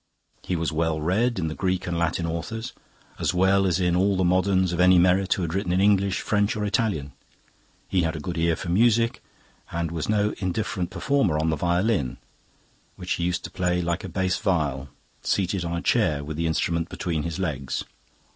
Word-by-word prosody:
He 90 - -2
was 85 0 -1
well 80 0 0
read 105 +10 +1
in 80 -3 -1
the 80 - -3
Greek 95 +1 -1
and 85 - -2
Latin 85 0 0
authors, 85 +8 -4 0.5
as - - 0
well 95 +2 +3
as 90 0 +1
in 90 -1 +2
all 95 +2 +2
the 95 - +2
moderns 95 0 +2
of 85 - -3
any 90 0 +6
merit 90 +2 +3
who 95 - -3
had 80 -1 -3
written 95 -2 -1
in 90 - +2
English, 100 -1 +3
French, 105 0 +1
or 105 -1 -2
Italian. 100 -9 0 0.8
He 95 - +1
had 80 -1 -1
a - - -4
good 85 +3 -4
ear 85 0 +2
for 85 - -6
music, 115 +4 +3 0.5
and 85 -1 -2
was 80 +1 -3
no 105 0 +2
indifferent 95 -1 -2
performer 135 - +1
on 80 +1 +1
the - - +1
violin, 85 - 0 0.8
which 90 0 -7
he 85 - 0
used 90 0 -1
to - - -7
play 90 -1 0
like 85 0 -1
a 95 - -5
bass 95 0 0
viol, 70 -8 -1 0.3
seated 95 -1 0
on 85 0 -2
a 85 - -5
chair 80 -12 +2
with 75 +1 -5
the 85 +1 -1
instrument 85 +1 0
between 85 -5 -2
his 85 +1 -4
legs. 70 -8 -2
90 Hz, 205 wpm, -25 LUFS, 85-95 Hz, 0.8 s, any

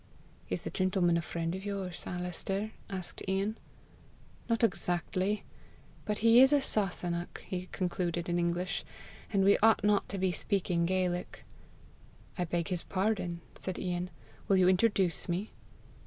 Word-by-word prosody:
"Is - - -1
the - - -4
gentleman 185 -2 +2
a 170 - +2
friend 165 +1 -3
of 190 +1 -5
yours, 195 -3 -4
Alister?" 180 +4 -2 0.2
asked 185 -3 -4
Ian. 195 +3 0 0.9
"Not 230 0 +1
exactly. 185 0 +1 0.6
But 210 -1 -1
he 230 +2 +8
is 265 +1 +7
a 290 - +5
Sasunnach," 180 -8 -1
he 185 0 -4
concluded 175 -2 -1
in 175 0 +1
English, 175 +2 -1 0.5
"and 195 -3 +3
we 200 +1 +5
ought 220 -1 +5
not 205 -1 +2
to 200 - -3
be 190 -1 +1
speaking 175 -1 0
Gaelic." 180 -1 -1 0.9
"I 180 - -1
beg 170 0 -1
his 180 -2 -1
pardon," 185 -3 -1
said 185 - -5
Ian. 180 0 -2 0.4
"Will 195 - +4
you 185 -1 +5
introduce 190 -2 +2
me?" 185 +5 -2
185 Hz, 145 wpm, -31 LUFS, 175-200 Hz, 0.9 s, he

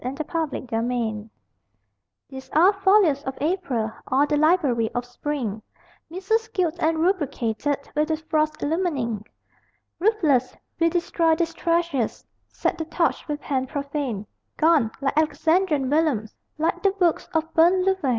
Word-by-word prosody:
BURNING 255 +2 -3
LEAVES, 310 -4 -3
NOVEMBER 225 -2 -2 1.0
These 265 -1 -10
are 355 +6 +6
folios 385 -7 +3
of 265 0 -5
April, 285 - -1 0.2
All 275 +2 +3
the 295 - 0
library 295 -8 +2
of 245 0 -1
spring, 245 -4 -4 0.5
Missals 400 +6 -1
gilt 355 -6 -1
and 320 +1 +2
rubricated 290 - 0 0.2
With 300 +1 +2
the 315 -1 0
frost's 310 -1 -1
illumining. 290 - -1 0.8
Ruthless, 325 - +2 0.2
we 335 0 +4
destroy 335 -1 +1
these 330 0 -1
treasures, 335 -8 -1 0.2
Set 350 - -2
the 320 - -2
torch 330 +1 -1
with 295 -1 -3
hand 260 -2 -2
profane 280 -7 -3 0.3
Gone, 310 -8 +4
like 275 0 0
Alexandrian 315 -1 +2
vellums, 285 -7 +1 0.2
Like 320 +2 0
the 395 - +4
books 355 -5 0
of 320 0 -1
burnt 360 +3 +4
Louvain! 380 -8 +1
310 Hz, 140 wpm, -24 LUFS, 265-340 Hz, 1.0 s, are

